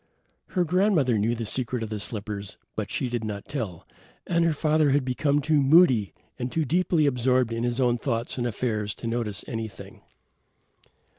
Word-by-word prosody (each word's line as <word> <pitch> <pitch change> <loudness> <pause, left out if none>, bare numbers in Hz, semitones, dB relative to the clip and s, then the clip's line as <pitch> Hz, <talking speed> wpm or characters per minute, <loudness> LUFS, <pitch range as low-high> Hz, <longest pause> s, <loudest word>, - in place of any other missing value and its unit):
Her 180 - +4
grandmother 175 - +2
knew 115 +3 +1
the 115 -1 -4
secret 125 +1 -2
of 110 - -5
the 110 -1 -4
slippers, 100 -2 -5 0.2
but 105 -2 -3
she 130 - -1
did 120 -2 -3
not 105 -2 -5
tell, 110 - -5 0.4
and 170 -1 +2
her 165 - +3
father 155 0 +2
had 140 -1 +2
become 140 +3 +1
too 150 0 +2
moody 135 - +5 0.3
and 125 0 -3
too 160 -2 0
deeply 170 +1 +2
absorbed 125 -2 +2
in 115 - -2
his 120 +1 0
own 120 -2 +2
thoughts 120 0 -2
and 120 - 0
affairs 105 -3 -2
to - - -9
notice 115 -4 -2
anything. 110 -4 -7
125 Hz, 175 wpm, -26 LUFS, 110-145 Hz, 0.4 s, moody